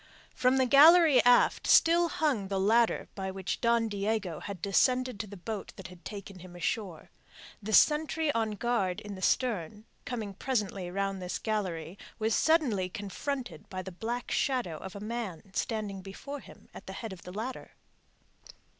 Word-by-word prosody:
From 255 +1 +2
the 260 - +4
gallery 305 +3 +7
aft 245 0 +4
still 340 +1 +5
hung 270 -14 0
the 195 0 -1
ladder 225 +4 +2
by 190 -1 -4
which 190 -1 -4
Don 235 -1 +3
Diego 200 -4 -2
had 200 -3 -7
descended 250 +5 +1
to 210 - -4
the 200 0 -10
boat 205 +2 -6
that 185 -1 -9
had 180 -1 -15
taken 200 -2 -8
him 175 0 -12
ashore. 175 -1 -3 0.5
The 215 +1 -5
sentry 310 +3 +4
on 225 -4 -1
guard 205 -5 -1
in 205 -1 -7
the 190 - -9
stern, 210 -3 0 0.2
coming 220 -5 -4
presently 200 -5 -2
round 195 +1 -2
this 180 0 -3
gallery, 185 -5 -3 0.2
was 220 0 0
suddenly 255 - +2
confronted 205 - -5
by 185 -1 -5
the 190 - -7
black 235 +7 -4
shadow 250 - 0
of 190 +4 -9
a - - -6
man 210 -4 -5
standing 210 -4 -3
before 270 +10 -8
him - - -16
at - - -11
the - - -6
head 225 -4 -6
of 180 - -12
the 180 - -9
ladder. 225 +7 -6
210 Hz, 170 wpm, -30 LUFS, 190-245 Hz, 0.5 s, gallery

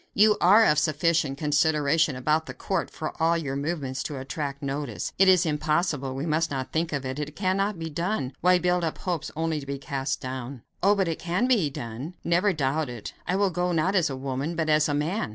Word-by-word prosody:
You 210 +1 +6
are 210 +6 +7
of 150 -5 +4
'sufficient 155 -2 +1
consideration 150 0 +2
about 155 +5 0
the 125 - -7
court' 190 +8 -2
for 155 - -5
all 165 +1 +3
your 140 -5 -3
movements 140 -3 -3
to 145 - -4
attract 140 +1 -5
notice. 140 -4 -3
It 195 - +6
is 185 -1 +5
impossible; 150 -3 0
we 135 +3 -3
must 160 +1 +1
not 135 -2 -4
think 160 +1 -1
of 140 -3 -3
it; 130 +2 -4
it 150 0 -5
cannot 195 +1 0
be 165 0 -4
done. 160 -3 -2
Why 180 0 +5
build 180 0 +1
up 160 - -2
hopes 175 -4 -3
only 160 -1 -1
to 140 - -9
be 140 0 -3
cast 135 0 -3
down?" 130 -1 -6 0.2
"Oh! 200 +3 +4
but 195 -3 +1
it 165 - -2
can 175 +7 0
be 225 - +3
done; 130 +6 -7
never 175 +4 +2
doubt 150 -2 -1
it. 120 -4 -7
I 180 - +1
will 200 -1 +2
go, 180 +1 0
not 170 +3 +1
as 175 -6 +2
a 135 - -4
woman, 135 +5 -3
but 160 -1 -1
as 155 0 +3
a 145 - +1
man. 155 - -1
155 Hz, 225 wpm, -26 LUFS, 140-175 Hz, 0.2 s, are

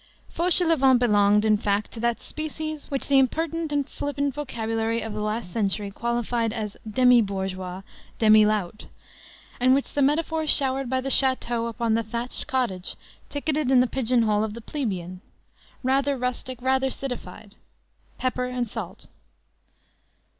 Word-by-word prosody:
Fauchelevent 330 -7 +3
belonged, 210 -3 +3
in 215 -1 +4
fact, 205 0 -1
to 230 - -8
that 235 0 -1
species, 310 0 -5
which 275 -2 -2
the 275 -1 +5
impertinent 325 +4 0
and 285 -1 0
flippant 285 -1 -2
vocabulary 225 -4 -2
of 220 -1 -5
the 210 - -4
last 215 -2 -3
century 200 0 -1
qualified 235 +1 -1
as 215 -2 -4
demi 250 +1 +5
bourgeois, 190 -2 -4 0.3
demi 215 -1 +6
lout, 210 -2 -1 0.7
and 255 +1 +5
which 275 - -2
the 290 - +1
metaphors 315 +2 +1
showered 270 -2 +3
by 260 0 +1
the 265 +1 -3
château 245 -4 +3
upon 230 0 -1
the 225 - +2
thatched 235 +3 -4
cottage 235 -9 -2 0.3
ticketed 295 -1 -1
in 265 -1 +5
the 250 - +5
pigeon 250 -1 +1
hole 210 -1 +2
of 215 -1 -4
the 235 - -8
plebeian: 185 - -4 0.6
rather 270 +2 +1
rustic, 250 0 -3
rather 265 0 +2
citified; 245 -6 -6 0.6
pepper 255 -1 -1
and 250 -1 -2
salt. - - -6
245 Hz, 145 wpm, -25 LUFS, 215-270 Hz, 0.7 s, demi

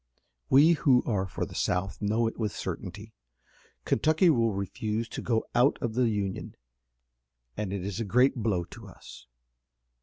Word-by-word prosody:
We 145 +5 +6
who 135 -6 +3
are 95 -4 -1
for - - -4
the - - -11
South 95 +3 -2
know 110 +3 +1
it 115 - -2
with 110 -3 -2
certainty. 100 +4 -6 0.7
Kentucky 160 - +3
will 115 -5 +2
refuse 105 +3 -3
to - - -6
go 115 -2 0
out 125 +4 +3
of 115 - -3
the 120 0 +2
Union, 100 -3 -3 1.0
and 105 -3 -3
it 95 -2 -4
is 100 0 -4
a - - -1
great 125 +6 +3
blow 105 -7 0
to 85 - -12
us. 60 - -13
110 Hz, 160 wpm, -28 LUFS, 100-120 Hz, 1.0 s, We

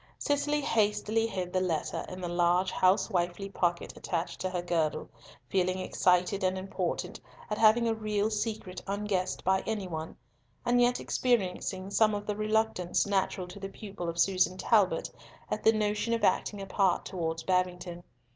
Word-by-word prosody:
Cicely 295 +1 0
hastily 225 -2 +1
hid 185 -4 -4
the 185 - +2
letter 165 -4 -1
in 185 0 -7
the 175 - -3
large 175 +2 +2
housewifely 185 0 +1
pocket 175 -3 -1
attached 170 -1 -3
to 185 - -1
her 180 -1 -3
girdle, 165 -3 -1 0.4
feeling 185 -1 +1
excited 185 +1 +1
and 185 0 +1
important 185 -2 -3 0.3
at 210 - -1
having 225 +1 +5
a 225 - +2
real 215 -1 -1
secret 210 -4 -3
unguessed 200 -2 -1
by 190 +1 +2
any 215 -4 -2
one, 160 -2 -6 0.5
and 245 0 +3
yet 245 0 +3
experiencing 195 -5 -1
some 215 0 +3
of 205 0 -4
the 210 - -2
reluctance 215 -4 +1
natural 190 -2 0
to 200 - -9
the 195 0 -5
pupil 195 -4 -6
of 165 - -5
Susan 185 0 +2
Talbot 190 -6 +2 0.4
at - - -2
the 220 - +7
notion 215 +1 0
of 230 - -4
acting 200 +1 +1
a - - -5
part 190 -2 +1
towards 165 -3 -3
Babington. 180 -1 -1
190 Hz, 165 wpm, -30 LUFS, 180-215 Hz, 0.5 s, the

